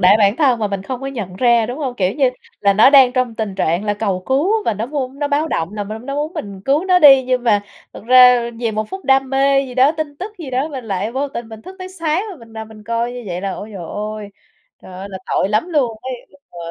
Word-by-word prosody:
đãi 190 Hz, +3 st, +6 dB
bản 205 Hz, +1 st, +3 dB
thân 260 Hz, -7 st, +3 dB
mà 215 Hz, -, 0 dB
mình 200 Hz, -1 st, -4 dB
không 255 Hz, +3 st, -5 dB
có 270 Hz, -, -5 dB
nhận 210 Hz, -9 st, -6 dB
ra, 235 Hz, -2 st, +3 dB
đúng 250 Hz, +5 st, -6 dB
hông? 260 Hz, -5 st, -3 dB
Kiểu 185 Hz, -1 st, 0 dB
như 275 Hz, -3 st, +3 dB, 0.3 s
là 200 Hz, -1 st, +4 dB
nó 220 Hz, +7 st, +6 dB
đang 265 Hz, -3 st, +6 dB
trong 255 Hz, -3 st, -1 dB
tình 215 Hz, -4 st, -4 dB
trạng 170 Hz, +3 st, 0 dB
là 205 Hz, -1 st, 0 dB
cầu 195 Hz, -4 st, -2 dB
cứu 290 Hz, +10 st, +1 dB
và 215 Hz, -, 0 dB
nó 220 Hz, +4 st, -3 dB
vuông 275 Hz, -1 st, -4 dB
nó 290 Hz, -1 st, -1 dB
báo 300 Hz, +2 st, 0 dB
động 165 Hz, +5 st, -2 dB
là 205 Hz, -1 st, -3 dB
n 220 Hz, +4 st, -8 dB
nó 275 Hz, -, -3 dB
muốn 300 Hz, +3 st, -2 dB
mình 200 Hz, -2 st, -6 dB
cứu 290 Hz, +6 st, +1 dB
nó 365 Hz, -1 st, +4 dB
đi. 270 Hz, -5 st, +7 dB
Nhưng 250 Hz, -1 st, -1 dB
mà 210 Hz, -3 st, +3 dB, 0.3 s
thực -, -, -11 dB
ra 250 Hz, -1 st, +6 dB
vì 230 Hz, -2 st, -1 dB
một 215 Hz, 0 st, -3 dB
phút 380 Hz, 0 st, -8 dB
đam 270 Hz, -1 st, +2 dB
mê 275 Hz, 0 st, +3 dB
gì 250 Hz, -, -9 dB
đó, 265 Hz, +4 st, +4 dB
tin 310 Hz, -3 st, -5 dB
tức 390 Hz, +6 st, -7 dB
gì 310 Hz, -6 st, -7 dB
đó, 260 Hz, +4 st, -1 dB
mình 265 Hz, -5 st, -7 dB
lại 200 Hz, +2 st, -3 dB
vô 280 Hz, +2 st, -2 dB
tình 235 Hz, -4 st, -7 dB
mình 220 Hz, 0 st, -11 dB
thức 380 Hz, -, -11 dB
tới 370 Hz, -, -7 dB
sáng, 340 Hz, +1 st, -2 dB
rồi 370 Hz, -, -9 dB
mình 230 Hz, -2 st, -16 dB
nằm 220 Hz, 0 st, -7 dB
mình 215 Hz, -1 st, -14 dB
coi 230 Hz, +2 st, -2 dB
như 245 Hz, -1 st, -7 dB
vậy 180 Hz, -1 st, -4 dB
là, 195 Hz, -1 st, -3 dB
ôi 210 Hz, -, -7 dB
trời 180 Hz, -, -6 dB
ơi, 210 Hz, +3 st, -6 dB, 0.5 s
trời 185 Hz, -, -12 dB
ơi, 190 Hz, +2 st, -8 dB
là 190 Hz, -, -6 dB
tội 190 Hz, -, 0 dB
lắm 215 Hz, -, 0 dB
luôn 260 Hz, -9 st, 0 dB
ấy, 260 Hz, 0 st, -4 dB, 0.2 s
nhưng 285 Hz, -, -22 dB
mà -, -, -15 dB
245 Hz, 285 wpm, -18 LUFS, 210-275 Hz, 0.5 s, đi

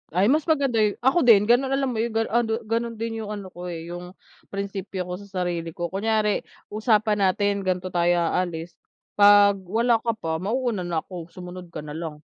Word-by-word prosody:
Ay, 200 Hz, +7 st, +4 dB
mas 310 Hz, +1 st, +1 dB
maganda 275 Hz, -8 st, +2 dB
yu 210 Hz, -2 st, +2 dB
ako 265 Hz, +6 st, +4 dB
din, 210 Hz, -4 st, +8 dB
gano'n 245 Hz, +5 st, +3 dB
alam 270 Hz, -1 st, 0 dB
mo 225 Hz, -, -3 dB
'yun, 225 Hz, 0 st, -2 dB
ganu 225 Hz, -1 st, 0 dB
ano 235 Hz, -1 st, +1 dB
gano'n 230 Hz, +1 st, -2 dB
din 225 Hz, 0 st, -4 dB
'yung 220 Hz, -, -5 dB
ano 205 Hz, -3 st, -6 dB
ko, 180 Hz, +1 st, -8 dB
eh, 170 Hz, 0 st, -6 dB
'yung 180 Hz, +2 st, -8 dB, 0.3 s
prinsipyo 195 Hz, -1 st, -4 dB
ko 180 Hz, +1 st, -6 dB
sa 200 Hz, -, -12 dB, 0.2 s
sarili 170 Hz, -2 st, -3 dB
ko, 175 Hz, 0 st, -4 dB
kunyari 210 Hz, +1 st, +1 dB, 0.3 s
usapan 215 Hz, -1 st, +2 dB
natin 200 Hz, +1 st, +1 dB
gan'to 185 Hz, -1 st, -2 dB
tayo 175 Hz, 0 st, +2 dB
aalis, 170 Hz, -1 st, -2 dB, 0.4 s
pag 205 Hz, -1 st, +7 dB
wala 230 Hz, +3 st, +2 dB
ka 230 Hz, 0 st, -1 dB
pa, 160 Hz, -6 st, -3 dB
mauna 215 Hz, -1 st, -1 dB
na 165 Hz, -2 st, -1 dB
ako 175 Hz, -3 st, -8 dB
sumunod 180 Hz, +1 st, -9 dB
ka 155 Hz, -2 st, -8 dB
nalang. 150 Hz, 0 st, -7 dB
200 Hz, 195 wpm, -24 LUFS, 175-225 Hz, 0.4 s, din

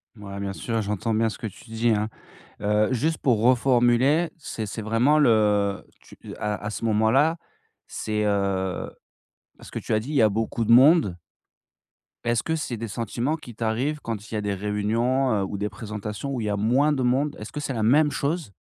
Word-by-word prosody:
Mouais, 100 Hz, -2 st, -8 dB
bien 100 Hz, -1 st, -3 dB
sûr, 110 Hz, +5 st, -2 dB
j'entends 105 Hz, +2 st, -2 dB
bien 110 Hz, +1 st, +2 dB
ce -, -, -7 dB
que 110 Hz, -, -5 dB
tu 110 Hz, +3 st, -13 dB
dis, 115 Hz, +1 st, +1 dB
hein. 110 Hz, 0 st, 0 dB, 0.5 s
Heu, 105 Hz, +3 st, +2 dB
juste 155 Hz, +6 st, 0 dB
pour 120 Hz, -5 st, +2 dB
reformuler, 125 Hz, +5 st, +3 dB
c'est 115 Hz, -7 st, -5 dB
c'est 110 Hz, -, -5 dB
vraiment 115 Hz, +8 st, +3 dB
le 105 Hz, -6 st, +2 dB, 0.2 s
tu, -, -, -16 dB
heu -, -, -9 dB
à 105 Hz, 0 st, -3 dB
à 105 Hz, -, -2 dB
ce 105 Hz, +2 st, -5 dB
moment-là, 115 Hz, +9 st, +3 dB, 0.5 s
c'est 105 Hz, -1 st, -2 dB
heu 100 Hz, -2 st, -1 dB, 0.7 s
parce -, -, -13 dB
que -, -, -4 dB
tu -, -, -5 dB
as 110 Hz, -, +4 dB
dit: 115 Hz, +7 st, -6 dB
«il -, -, -3 dB
y 135 Hz, -, +4 dB
a 110 Hz, -, +6 dB
beaucoup 115 Hz, +2 st, -2 dB
de 110 Hz, -, -1 dB
monde» 130 Hz, -, +6 dB, 1.1 s
est-ce 120 Hz, -1 st, 0 dB
que 160 Hz, -, -1 dB
c'est 140 Hz, -6 st, -4 dB
des 115 Hz, +1 st, -5 dB
sentiments 115 Hz, +7 st, -2 dB
qui 125 Hz, -8 st, -11 dB
t'arrivent 120 Hz, +7 st, -1 dB
quand 110 Hz, -2 st, -5 dB
il -, -, -3 dB
y -, -, 0 dB
a -, -, -1 dB
des 105 Hz, -1 st, -1 dB
réunions, 110 Hz, +6 st, 0 dB
heu, 100 Hz, -2 st, +1 dB
ou 100 Hz, -, -4 dB
des 105 Hz, +1 st, -2 dB
présentations 105 Hz, +3 st, -6 dB
où 130 Hz, -, -2 dB
il -, -, -3 dB
y -, -, -1 dB
a 105 Hz, -, 0 dB
moins 130 Hz, +8 st, +2 dB
de 135 Hz, -, -1 dB
monde? 135 Hz, +4 st, +1 dB
Est-ce 105 Hz, -, -8 dB
que 150 Hz, -, -5 dB
c'est 145 Hz, -2 st, -3 dB
la 115 Hz, -, -2 dB
même 145 Hz, +7 st, +4 dB
chose? 145 Hz, -, -2 dB
115 Hz, 215 wpm, -25 LUFS, 105-130 Hz, 1.1 s, a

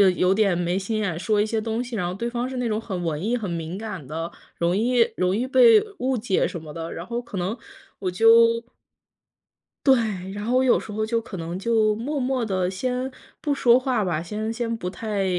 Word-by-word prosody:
有 180 Hz, +1 st, +3 dB
点 195 Hz, -4 st, +2 dB
没 175 Hz, +1 st, 0 dB
心 215 Hz, +3 st, -2 dB
眼 180 Hz, -6 st, -1 dB
说 210 Hz, +3 st, +1 dB
一 -, -, +2 dB
些 220 Hz, 0 st, -1 dB
东 225 Hz, +2 st, -2 dB
西， 245 Hz, -1 st, -6 dB
然 190 Hz, -5 st, -1 dB
后 180 Hz, -, -3 dB
对 235 Hz, +5 st, -3 dB
方 245 Hz, +1 st, -2 dB
是 260 Hz, -, -5 dB
那 245 Hz, -1 st, -1 dB
种 215 Hz, -1 st, 0 dB
很 190 Hz, -5 st, -4 dB
文 160 Hz, -1 st, -2 dB
艺 235 Hz, +4 st, +1 dB
很 220 Hz, -4 st, -4 dB
敏 170 Hz, +1 st, -4 dB
感 200 Hz, -8 st, -6 dB
的， 165 Hz, +3 st, -4 dB, 0.3 s
容 170 Hz, +1 st, +1 dB
易 235 Hz, +1 st, +3 dB
容 185 Hz, +1 st, +1 dB
易 240 Hz, -, 0 dB
被 455 Hz, -, +7 dB, 0.2 s
误 255 Hz, 0 st, 0 dB
解 210 Hz, -3 st, +1 dB
什 175 Hz, -, -6 dB
么 155 Hz, -1 st, -9 dB
的， 165 Hz, +1 st, -5 dB
然 170 Hz, -, -6 dB
后 235 Hz, +3 st, -3 dB
可 235 Hz, -4 st, -8 dB
能 185 Hz, +4 st, -1 dB, 0.4 s
我 190 Hz, -, -1 dB
就 230 Hz, +3 st, +5 dB, 1.2 s
对， 265 Hz, -1 st, +7 dB, 0.4 s
然 205 Hz, +1 st, -5 dB
后 240 Hz, +3 st, +1 dB
我 260 Hz, -, +4 dB
有 250 Hz, -, +4 dB
时 -, -, -9 dB
候 215 Hz, +1 st, -2 dB
就 230 Hz, +1 st, 0 dB
可 220 Hz, -3 st, -8 dB
能 170 Hz, 0 st, -5 dB
就 215 Hz, +1 st, +2 dB
默 270 Hz, +8 st, -3 dB
默 255 Hz, -2 st, 0 dB
地 185 Hz, -4 st, 0 dB
先 250 Hz, +7 st, -2 dB, 0.3 s
不 290 Hz, -, 0 dB
说 245 Hz, -3 st, +5 dB
话 255 Hz, -4 st, 0 dB
吧， 175 Hz, -5 st, -1 dB
先 215 Hz, +6 st, -3 dB
先 230 Hz, 0 st, -2 dB
不 180 Hz, -4 st, -4 dB
太 205 Hz, 0 st, -2 dB
215 Hz, 245 characters per minute, -24 LUFS, 185-240 Hz, 1.2 s, 被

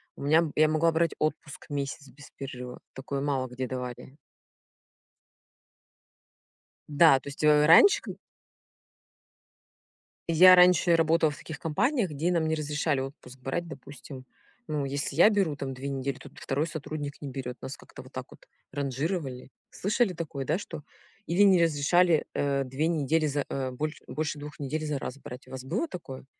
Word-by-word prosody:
У -, -, -9 dB
меня 155 Hz, +3 st, +4 dB
б 155 Hz, -, -4 dB
я 155 Hz, 0 st, +5 dB
могла 155 Hz, +2 st, +2 dB
брать 165 Hz, 0 st, +1 dB
отпуск 155 Hz, -1 st, -3 dB
месяц 140 Hz, 0 st, -4 dB
без 145 Hz, +2 st, -15 dB
перерыва- 125 Hz, -2 st, -7 dB
такое 135 Hz, +1 st, -4 dB
мало 135 Hz, -2 st, -1 dB
где 125 Hz, +1 st, -5 dB
давали. 125 Hz, +1 st, -7 dB, 2.7 s
Да, 145 Hz, -2 st, +6 dB
то -, -, -15 dB
есть, 140 Hz, -, -7 dB
э, 150 Hz, 0 st, +5 dB
раньше 400 Hz, -, +7 dB
к -, -, -7 dB, 2.1 s
я 180 Hz, +3 st, +8 dB
раньше 180 Hz, -1 st, +5 dB
работала 165 Hz, -1 st, +3 dB
в 145 Hz, -, -10 dB
таких 160 Hz, -, -8 dB
компаниях, 215 Hz, -, 0 dB
где 155 Hz, +4 st, -1 dB
нам 165 Hz, -2 st, +1 dB
не 160 Hz, -, +1 dB
разрешали 150 Hz, -1 st, -1 dB
отпуск 135 Hz, -1 st, -9 dB
брать, 135 Hz, +7 st, -3 dB
допустим, 140 Hz, -3 st, -10 dB, 0.4 s
ну, 150 Hz, -2 st, -2 dB
если 140 Hz, 0 st, -3 dB
я 175 Hz, +7 st, +7 dB
беру, 195 Hz, -8 st, +1 dB
там, 135 Hz, -2 st, -5 dB
2 135 Hz, +2 st, -5 dB
недели, 135 Hz, -1 st, -3 dB
т -, -, -12 dB
то -, -, -25 dB
2 140 Hz, +3 st, -1 dB
сотрудник 155 Hz, -2 st, -6 dB
не 145 Hz, -, -5 dB
берет. 130 Hz, -1 st, -6 dB
Нас 130 Hz, -, -7 dB
как-то -, -, -13 dB
вот -, -, -15 dB
так -, -, -6 dB
вот -, -, -17 dB, 0.2 s
ранжировали. 140 Hz, -1 st, -3 dB, 0.2 s
Слышали 210 Hz, 0 st, 0 dB
такое, 155 Hz, -5 st, -5 dB
да, 155 Hz, +5 st, 0 dB
что? 170 Hz, -6 st, -8 dB, 0.5 s
Или 175 Hz, +4 st, +3 dB
не 190 Hz, -3 st, +5 dB
разрешали, 165 Hz, +2 st, +3 dB
э, 140 Hz, -1 st, 0 dB
2 135 Hz, +4 st, -2 dB
недели 160 Hz, -1 st, +1 dB
за, 145 Hz, -1 st, -1 dB
э, 135 Hz, -1 st, -3 dB
боль 150 Hz, +4 st, -3 dB
больше 155 Hz, -1 st, -3 dB
2 150 Hz, 0 st, -9 dB
недель 150 Hz, +2 st, -3 dB
за 150 Hz, -2 st, -2 dB
раз 135 Hz, 0 st, -6 dB
брать. 125 Hz, -1 st, -10 dB
У -, -, -15 dB
вас 130 Hz, -1 st, -7 dB
было 185 Hz, -, -2 dB
такое? 135 Hz, -, -9 dB
150 Hz, 170 wpm, -28 LUFS, 135-165 Hz, 2.7 s, я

